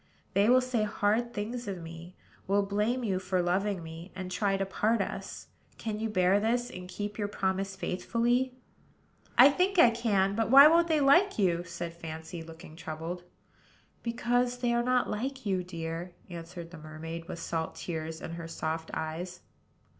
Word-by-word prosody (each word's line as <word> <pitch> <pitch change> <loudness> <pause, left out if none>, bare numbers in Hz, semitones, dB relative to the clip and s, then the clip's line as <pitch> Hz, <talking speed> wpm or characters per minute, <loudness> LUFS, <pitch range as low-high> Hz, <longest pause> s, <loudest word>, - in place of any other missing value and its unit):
They 200 +3 +4
will 255 +1 +6
say 255 -3 0
hard 215 +3 +1
things 235 +2 -4
of 195 -2 -3
me; 165 +2 -10 0.3
will 200 +1 +3
blame 210 +5 0
you 190 -5 0
for 185 0 -1
loving 185 +1 0
me; 165 +3 -9
and 185 -1 -5
try 195 +1 +1
to 195 - 0
part 215 +4 +1
us. - - -5 0.3
Can 215 -2 -4
you 225 0 -1
bear 185 -1 +3
this, 240 +3 0
and 180 0 -8
keep 205 +3 -5
your 205 - 0
promise 195 -1 -1
faithfully?" 240 +7 0 0.8
"I 265 +3 +9
think 370 +6 +1
I 245 -8 +8
can. 205 -4 +1
But 225 +2 0
why 275 +3 +10
won't 335 +2 +5
they 315 -3 +2
like 345 +9 +5
you?" 175 -4 +2
said 170 0 -5
Fancy, 165 0 -7
looking 165 0 -11
troubled. 165 +2 -5 0.8
"Because 245 +1 0
they 245 -1 +1
are 235 - +3
not 250 +1 +2
like 260 +4 -3
you, 190 -3 0
dear," 170 0 -5 0.2
answered 170 0 -8
the 165 - -10
mermaid, 160 +2 -7
with - - -5
salt 165 -1 -3
tears 160 -1 -5
in - - -6
her 165 0 -6
soft 160 0 -3
eyes. 170 +3 -4
195 Hz, 175 wpm, -30 LUFS, 170-235 Hz, 0.8 s, why